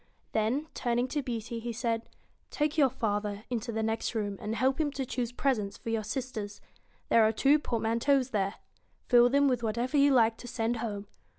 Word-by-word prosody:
Then, 225 +8 0
turning 240 0 0
to 295 - -1
Beauty, 235 -2 -4
he 235 +1 -4
said: 230 0 -2 0.4
'Take 300 0 -1
your 285 -4 +5
father 210 -4 -2
into 235 -1 -2
the 220 0 -2
next 225 +2 -1
room, 205 -2 -1
and 215 0 -3
help 265 +5 +1
him 300 - +1
to 270 -2 -3
choose 245 -1 -3
presents 245 -6 -1
for 230 - -5
your 225 -1 0
sisters. 215 -3 -4 0.5
There 230 - +6
are 220 0 +5
two 275 +7 +4
port 235 -6 -2
manteaus 255 +4 +2
there. 200 -1 0 0.5
Fill 245 -1 +7
them 280 +2 +4
with 250 -3 +1
whatever 235 +5 -1
you 285 0 +5
like 230 -3 +4
to 245 - -10
send 235 -1 -1
home. 210 -3 -4
235 Hz, 195 wpm, -30 LUFS, 220-260 Hz, 0.5 s, Fill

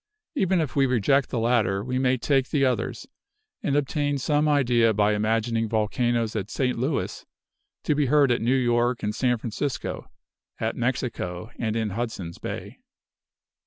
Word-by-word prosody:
Even 190 - +2
if 155 -4 -2
we 135 -1 +4
reject 130 +3 +2
the 125 - -3
latter, 115 -4 +1
we 125 +2 -2
may 130 0 +2
take 135 +1 +1
the 140 -3 +2
others, 130 -1 -2 0.5
and 140 - 0
obtain 145 0 0
some 150 +2 +1
idea 120 -6 +3
by 105 0 +3
imagining 115 +1 0
volcanoes 115 +1 0
at 105 -1 -3
St. 125 0 0
Louis 135 +5 -2 0.6
to - - +2
be 145 -1 +1
heard 140 -1 +4
at 120 - +1
New 120 +4 +2
York 120 -1 +1
and 105 0 -1
San 125 +1 +1
Francisco, 120 +5 -4 0.5
at 110 0 -1
Mexico 120 -6 -3
and 110 -2 -1
in 110 -2 -1
Hudson's 100 -6 -4
Bay. - - -6
120 Hz, 160 wpm, -25 LUFS, 110-135 Hz, 0.6 s, we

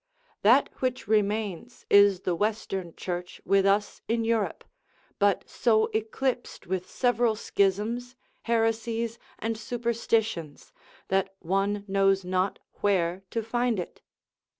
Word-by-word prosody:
That 245 +7 +5
which 255 -2 -1
remains 210 0 -1
is 200 -2 +6
the 180 - 0
Western 195 -3 -2
Church 180 0 -5
with 195 0 +4
us 205 +1 +1
in 230 0 0
Europe, 225 -2 0 0.6
but 200 -2 +2
so 220 -2 +2
eclipsed 240 +4 -2
with 185 0 -3
several 240 -2 +2
schisms, 215 +5 0 0.3
heresies 230 0 0 0.2
and 225 0 -2
superstitions, 225 -7 -2 0.4
that 195 0 0
one 195 +3 -1
knows 195 -1 +2
not 185 +1 0 0.2
where 185 -3 +1
to 230 - -2
find 240 -1 0
it. 175 - -7
210 Hz, 115 wpm, -27 LUFS, 195-230 Hz, 0.6 s, is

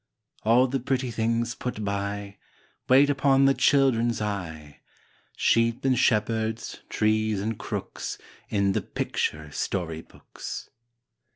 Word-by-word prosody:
All 120 +4 +5
the 135 +1 -1
pretty 130 0 -1
things 115 +1 0
put 125 -4 -4
by, 100 0 -3 0.5
Wait 135 +3 +7
upon 135 -1 +4
the 135 - +5
children's 120 -5 +3
eye, 85 -8 -5 0.6
Sheep 115 +2 +2
and 130 -1 +4
shepherds, 110 -1 0
trees 110 -1 +1
and 110 +3 -2
crooks, - - -5 0.3
In 100 -2 +2
the - - 0
picture 75 -1 -3
story 80 0 -3
books. - - -9
110 Hz, 115 wpm, -26 LUFS, 100-125 Hz, 0.6 s, Wait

